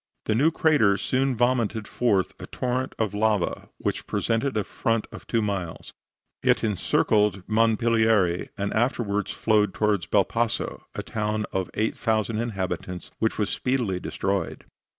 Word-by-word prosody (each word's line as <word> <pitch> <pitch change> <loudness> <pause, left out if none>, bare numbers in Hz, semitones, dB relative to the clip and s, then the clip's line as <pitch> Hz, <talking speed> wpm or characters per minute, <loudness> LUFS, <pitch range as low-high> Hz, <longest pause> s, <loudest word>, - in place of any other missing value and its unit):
The 110 - +1
new 140 +9 +4
crater 150 - +3
soon 130 +5 0
vomited 115 -3 +1
forth 105 -7 +1
a - - -8
torrent 130 +1 -2
of 110 -3 -1
lava 105 -3 0
which - - -3
presented 115 +1 0
a 105 - +1
front 115 +1 -1
of - - -11
two 115 -2 +1
miles; 95 -5 -4 0.5
it - - +2
encircled 105 -1 +1
Monpilieri, 110 -4 +2
and 100 0 -2
afterward 110 -3 0
flowed 105 -3 +2
towards 105 -4 +1
Belpasso, 115 +3 0
a - - -3
town 105 0 -2
of 95 -1 -1
8,000 110 0 0
inhabitants, 95 -5 -4
which 110 - 0
was 105 - 0
speedily 120 -8 0
destroyed. - - -2
110 Hz, 135 wpm, -25 LUFS, 100-115 Hz, 0.5 s, new